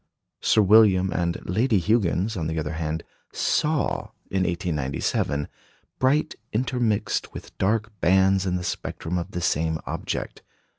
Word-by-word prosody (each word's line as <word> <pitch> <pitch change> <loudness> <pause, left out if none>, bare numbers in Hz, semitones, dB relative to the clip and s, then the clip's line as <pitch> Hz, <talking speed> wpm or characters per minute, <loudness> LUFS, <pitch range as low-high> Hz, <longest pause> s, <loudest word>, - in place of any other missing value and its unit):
Sir 110 - +4
William 95 -2 +5
and 85 -1 0
Lady 110 +4 +2
Huggins, 100 +1 +1
on 80 -4 -2
the 80 0 -3
other 75 0 -2
hand, 80 0 -3 0.3
saw, 150 -1 0 0.3
in 95 - +1
1897, 75 -3 -1 0.5
bright 135 +4 +2 0.2
intermixed 120 -2 0
with - - -9
dark 110 +3 +1
bands 95 +1 +3
in 90 - 0
the 90 - -2
spectrum 90 0 -3
of 85 - -5
the 90 - -4
same 80 -2 0
object. - - -4
95 Hz, 135 wpm, -25 LUFS, 80-110 Hz, 0.5 s, William